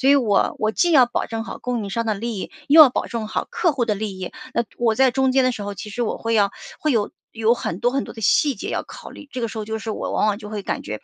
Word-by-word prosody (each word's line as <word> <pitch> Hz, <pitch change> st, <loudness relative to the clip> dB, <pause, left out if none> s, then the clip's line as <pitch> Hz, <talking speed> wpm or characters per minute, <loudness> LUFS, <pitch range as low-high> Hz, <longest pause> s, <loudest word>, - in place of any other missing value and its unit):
所 265 Hz, -, +3 dB
以 285 Hz, -, +7 dB
我 215 Hz, -7 st, +2 dB
我 215 Hz, 0 st, 0 dB
既 350 Hz, -2 st, +2 dB
要 260 Hz, -4 st, +7 dB
保 240 Hz, -, -2 dB
证 225 Hz, 0 st, -4 dB
好 -, -, -7 dB
供 245 Hz, -3 st, -2 dB
应 200 Hz, -, -6 dB
商 230 Hz, +3 st, -2 dB
的 215 Hz, -, +1 dB
利 225 Hz, 0 st, -4 dB
益， -, -, -5 dB, 0.2 s
又 315 Hz, +3 st, +8 dB
要 280 Hz, -, +8 dB
保 -, -, -1 dB
证 225 Hz, -3 st, -4 dB
好 -, -, -2 dB
客 340 Hz, -4 st, +1 dB
户 250 Hz, -4 st, 0 dB
的 215 Hz, -2 st, 0 dB
利 200 Hz, -2 st, -5 dB
益。 185 Hz, -, -6 dB, 0.2 s
那 235 Hz, -, +1 dB
我 230 Hz, -2 st, +2 dB
在 265 Hz, +1 st, +4 dB
中 265 Hz, +1 st, +2 dB
间 265 Hz, -1 st, +4 dB
的 255 Hz, -, +2 dB
时 215 Hz, -, -7 dB
候， 200 Hz, 0 st, -5 dB
其 210 Hz, -, -8 dB
实 245 Hz, -, -5 dB
我 225 Hz, -, -1 dB
会 230 Hz, 0 st, -2 dB
要 200 Hz, -2 st, +3 dB, 0.3 s
会 305 Hz, -, +1 dB
有 210 Hz, -3 st, +1 dB, 0.2 s
有 225 Hz, +1 st, +2 dB
很 185 Hz, -4 st, -4 dB
多 245 Hz, 0 st, +2 dB
很 275 Hz, +1 st, 0 dB
多 -, -, -10 dB
的 220 Hz, -, -9 dB
细 280 Hz, +7 st, +3 dB
节 200 Hz, -, -6 dB
要 -, -, -1 dB
考 -, -, -11 dB
虑， 290 Hz, -, -12 dB
这 255 Hz, -, -5 dB
个 230 Hz, -, 0 dB
时 220 Hz, -, -7 dB
候 210 Hz, -, -4 dB
就 220 Hz, 0 st, -3 dB
是 220 Hz, 0 st, -5 dB
我 -, -, -3 dB
往 -, -, +2 dB
往 205 Hz, -1 st, +1 dB
就 210 Hz, -2 st, -9 dB
会 210 Hz, -2 st, -5 dB
感 -, -, -3 dB
觉 105 Hz, +1 st, -6 dB
225 Hz, 350 characters per minute, -22 LUFS, 210-255 Hz, 0.3 s, 又